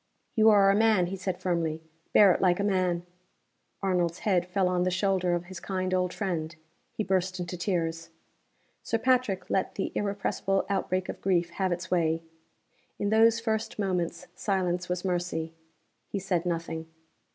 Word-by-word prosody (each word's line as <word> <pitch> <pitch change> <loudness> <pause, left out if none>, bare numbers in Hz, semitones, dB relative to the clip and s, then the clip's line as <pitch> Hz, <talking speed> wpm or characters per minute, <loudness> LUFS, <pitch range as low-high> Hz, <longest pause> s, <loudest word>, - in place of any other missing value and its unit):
"You 220 -1 +6
are 200 -2 +6
a - - +2
man," 215 -4 +4
he 185 +2 -4
said, 185 -1 -3
firmly. 165 -3 -1 0.3
"Bear 200 -2 +7
it - - 0
like 180 -1 +3
a - - +1
man." 185 -3 +1 0.8
Arnold's 175 -3 +1
head 180 -4 +1
fell 185 0 +1
on 180 -1 +1
the 180 - +2
shoulder 185 -1 +1
of 175 - -3
his 185 -1 -8
kind 185 -1 -2
old 180 -1 +1
friend. 170 -5 -3 0.4
He 215 - -3
burst 185 -1 0
into 175 0 -4
tears. 165 -3 -2 0.7
Sir 230 - -1
Patrick 250 -5 +1
let 190 - 0
the 195 - -2
irrepressible 200 -1 -1
outbreak 185 -1 -1
of - - -6
grief 175 -3 +1
have 190 +1 -1
its 175 +1 -4
way. 165 -2 +1 0.7
In 205 - -1
those 225 +1 +5
first 220 -1 -2
moments, 180 -3 -1
silence 180 -3 -1
was 180 +1 -2
mercy. 175 -3 -2 0.5
He - - -4
said 180 -3 -1
nothing. 165 -1 -3
185 Hz, 165 wpm, -28 LUFS, 175-195 Hz, 0.8 s, Bear